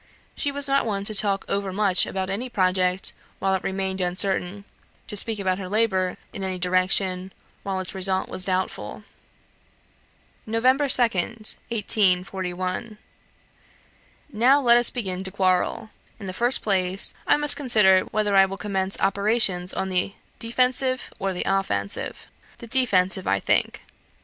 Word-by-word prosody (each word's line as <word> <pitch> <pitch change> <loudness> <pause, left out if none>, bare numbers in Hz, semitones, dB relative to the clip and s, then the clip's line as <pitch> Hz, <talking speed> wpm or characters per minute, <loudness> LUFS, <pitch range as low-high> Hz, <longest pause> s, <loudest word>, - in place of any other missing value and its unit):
She 285 - -1
was 285 0 +1
not 275 -3 +1
one 200 -2 -2
to 215 - 0
talk 200 -1 0
over 200 -1 -2
much 195 -1 +2
about 190 0 -4
any 240 +6 -3
project, 185 -3 +1 0.2
while 195 0 -1
it 190 - -1
remained 190 0 -3
uncertain 185 +2 0 0.4
to - - -7
speak 220 +2 +4
about 190 -1 -1
her 185 -2 -6
labour, 190 -4 0 0.2
in 195 - -6
any 190 -1 -3
direction, 185 +1 +1 0.3
while 195 -1 -3
its 185 0 -2
result 190 0 -1
was 185 - 0
doubtful. 185 0 -3 1.4
"Nov. 225 +1 -2
2nd, 240 -5 +1
1841. 190 -1 -1 1.4
"Now 250 +6 +4
let 240 -3 +5
us 240 -1 +5
begin 190 -6 -4
to 190 - -5
quarrel. 190 +2 -1 0.3
In 200 - -9
the 185 - -5
first 240 +6 +2
place, 190 -2 0
I - - +4
must 295 0 +5
consider 215 -9 +4
whether 210 -2 -1
I 195 0 +6
will 195 0 -7
commence 195 -1 -3
operations 195 -2 +1
on 190 - -3
the 185 +1 -1 0.3
defensive, 255 +2 +1
or 195 - -2
the 180 - -3
offensive. 100 - -3 0.3
The - - -10
defensive, 195 -7 +1
I 100 - +1
think. - - -1
195 Hz, 145 wpm, -23 LUFS, 185-225 Hz, 1.4 s, I